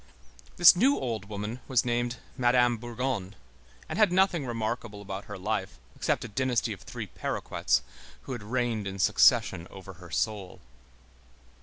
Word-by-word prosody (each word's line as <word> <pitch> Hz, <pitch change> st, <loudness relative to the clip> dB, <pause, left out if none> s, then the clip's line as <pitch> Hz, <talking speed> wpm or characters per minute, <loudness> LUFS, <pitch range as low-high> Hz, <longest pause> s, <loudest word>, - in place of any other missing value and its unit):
This 175 Hz, +1 st, +9 dB
new 260 Hz, +10 st, +4 dB
old 115 Hz, -5 st, -3 dB
woman 105 Hz, +3 st, -5 dB
was 125 Hz, -3 st, +2 dB
named 120 Hz, 0 st, 0 dB, 0.2 s
Madame 120 Hz, -2 st, +3 dB
Bourgon, 120 Hz, -4 st, -3 dB, 0.5 s
and -, -, -4 dB
had 210 Hz, -4 st, +5 dB
nothing 180 Hz, -6 st, +2 dB
remarkable 115 Hz, -2 st, -3 dB
about 100 Hz, 0 st, -6 dB
her 105 Hz, -, -7 dB
life 95 Hz, 0 st, -3 dB, 0.2 s
except -, -, -1 dB
a -, -, -5 dB
dynasty 125 Hz, +2 st, 0 dB
of -, -, -12 dB
three -, -, -6 dB
paroquets, -, -, -1 dB, 0.4 s
who -, -, -9 dB
had 120 Hz, -3 st, -4 dB
reigned 115 Hz, -1 st, -1 dB
in 95 Hz, 0 st, -5 dB
succession 90 Hz, -2 st, +4 dB
over 95 Hz, 0 st, -10 dB
her 90 Hz, -, -11 dB
soul. 100 Hz, +1 st, -2 dB
115 Hz, 150 wpm, -28 LUFS, 100-125 Hz, 0.5 s, This